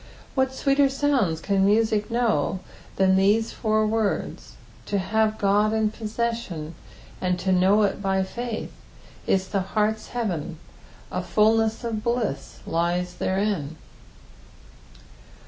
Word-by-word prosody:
What 265 Hz, -1 st, +1 dB
sweeter 275 Hz, +1 st, +2 dB
sounds 265 Hz, -, +1 dB
can 195 Hz, 0 st, +1 dB
music 210 Hz, +1 st, +2 dB
know 220 Hz, -7 st, 0 dB, 0.3 s
than 190 Hz, 0 st, +4 dB
thesa 210 Hz, +4 st, +2 dB
four 215 Hz, -1 st, +1 dB
words? 215 Hz, -1 st, -2 dB, 0.3 s
To 205 Hz, -, 0 dB
have 215 Hz, +3 st, +1 dB
God 210 Hz, +2 st, +2 dB
in 220 Hz, -1 st, +1 dB
possession, 220 Hz, -8 st, -3 dB, 0.5 s
and 180 Hz, -1 st, +1 dB
to 190 Hz, +1 st, -1 dB
know 190 Hz, +3 st, +4 dB
it 200 Hz, 0 st, 0 dB
by 190 Hz, -1 st, +1 dB
faith, 235 Hz, +3 st, -5 dB, 0.6 s
is 190 Hz, -1 st, +1 dB
the 195 Hz, -, 0 dB
heart's 215 Hz, +3 st, -1 dB
heaven 185 Hz, -9 st, -3 dB, 0.3 s
— -, -, -24 dB
a -, -, -2 dB
fulness 220 Hz, +1 st, +2 dB
of 220 Hz, -2 st, -3 dB
bliss 235 Hz, -, -2 dB
lies 175 Hz, +2 st, -1 dB
therein. 190 Hz, -6 st, -1 dB
210 Hz, 125 wpm, -24 LUFS, 190-225 Hz, 0.6 s, than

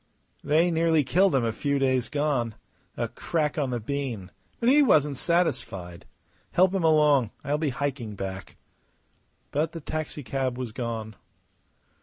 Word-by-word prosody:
"They 165 Hz, +4 st, +3 dB
nearly 160 Hz, -2 st, +3 dB
killed 180 Hz, +6 st, +3 dB
him 125 Hz, -3 st, +2 dB
a 115 Hz, -, +1 dB
few 140 Hz, +5 st, -1 dB
days 130 Hz, -2 st, +1 dB
gone. 140 Hz, -7 st, 0 dB, 0.4 s
A -, -, -1 dB
crack 155 Hz, -2 st, -2 dB
on 140 Hz, -3 st, 0 dB
the 120 Hz, -1 st, -2 dB
bean; 115 Hz, -6 st, -4 dB, 0.3 s
but 235 Hz, -, 0 dB
he 285 Hz, +4 st, +6 dB
wasn't 150 Hz, -, +4 dB
satisfied. 100 Hz, -, -1 dB, 0.5 s
Help 185 Hz, +1 st, +4 dB
him 190 Hz, -3 st, 0 dB
along. 150 Hz, -6 st, +4 dB
I'll 145 Hz, +2 st, 0 dB
be 155 Hz, -2 st, 0 dB
hiking 130 Hz, -5 st, -3 dB
back." 95 Hz, -1 st, -6 dB, 0.9 s
But 155 Hz, +3 st, 0 dB
the 165 Hz, -, -5 dB
taxicab 140 Hz, -4 st, -3 dB
was 125 Hz, -3 st, -4 dB
gone. 110 Hz, -3 st, -5 dB
140 Hz, 145 wpm, -26 LUFS, 120-155 Hz, 0.9 s, he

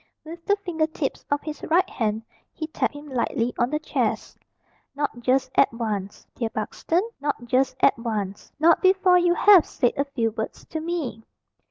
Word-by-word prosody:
With 335 Hz, +2 st, -9 dB
the 405 Hz, -, +4 dB
finger 350 Hz, -6 st, -1 dB
tips 305 Hz, -3 st, -4 dB
of 285 Hz, 0 st, 0 dB
his 305 Hz, -1 st, -6 dB
right 345 Hz, +4 st, +2 dB
hand 220 Hz, -1 st, -2 dB, 0.3 s
he 315 Hz, -, -5 dB
tapped 310 Hz, -1 st, -2 dB
him 290 Hz, +1 st, -10 dB
lightly 245 Hz, -2 st, -1 dB
on 240 Hz, -, +2 dB
the 300 Hz, -, 0 dB
chest. 305 Hz, -, -2 dB, 0.6 s
"Not 285 Hz, -4 st, -2 dB
just 255 Hz, +2 st, +1 dB
at -, -, +4 dB
once, 210 Hz, -4 st, -4 dB
dear 230 Hz, -2 st, -2 dB
Buxton, 325 Hz, -, -1 dB
not 285 Hz, -4 st, -3 dB
just 255 Hz, +2 st, +1 dB
at 270 Hz, -, +4 dB
once. 210 Hz, -4 st, -4 dB
Not 325 Hz, +3 st, +4 dB
before 375 Hz, -1 st, +5 dB
you 350 Hz, 0 st, +3 dB
have 395 Hz, -4 st, +7 dB
said 245 Hz, -, 0 dB
a 280 Hz, -, 0 dB
few 235 Hz, -5 st, -1 dB
words 220 Hz, 0 st, -6 dB
to 320 Hz, -, -3 dB
me." 310 Hz, -9 st, -3 dB
280 Hz, 180 wpm, -24 LUFS, 230-325 Hz, 0.6 s, have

